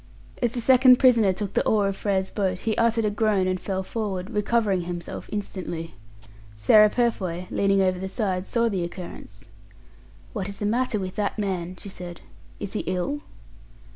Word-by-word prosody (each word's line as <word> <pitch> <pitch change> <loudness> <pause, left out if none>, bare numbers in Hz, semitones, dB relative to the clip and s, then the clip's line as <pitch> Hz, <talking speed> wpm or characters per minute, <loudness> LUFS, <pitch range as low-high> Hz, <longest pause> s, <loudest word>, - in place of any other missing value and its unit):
As 240 -2 +1
the 245 - -2
second 255 +1 +7
prisoner 235 -7 +5
took 200 +1 -4
the - - +2
oar 205 -2 +2
of 195 - -2
Frere's 190 -2 -1
boat, 185 -3 -1
he 220 -1 0
uttered 230 -1 +2
a 210 - +1
groan 205 -2 +2
and 185 0 0
fell 190 -1 -2
forward, 195 -3 -4
recovering 210 -2 +1
himself 175 0 -6
instantly. 180 -5 -5 0.6
Sarah 210 - +6
Purfoy, 190 -7 -1
leaning 195 0 +2
over 185 -1 +1
the 190 +1 -4
side, 190 -4 -2
saw 235 -1 +1
the 195 -6 -1
occurrence. 175 +1 -8 0.9
"What 200 -4 -3
is 200 - -8
the 205 - -3
matter 235 +1 +1
with 185 -2 -5
that 205 +1 -1
man?" 185 -3 -2
she 200 - -9
said. 175 -2 -8 0.4
"Is 200 - -5
he 215 - -1
ill?" 185 +11 -1
200 Hz, 175 wpm, -25 LUFS, 185-220 Hz, 0.9 s, second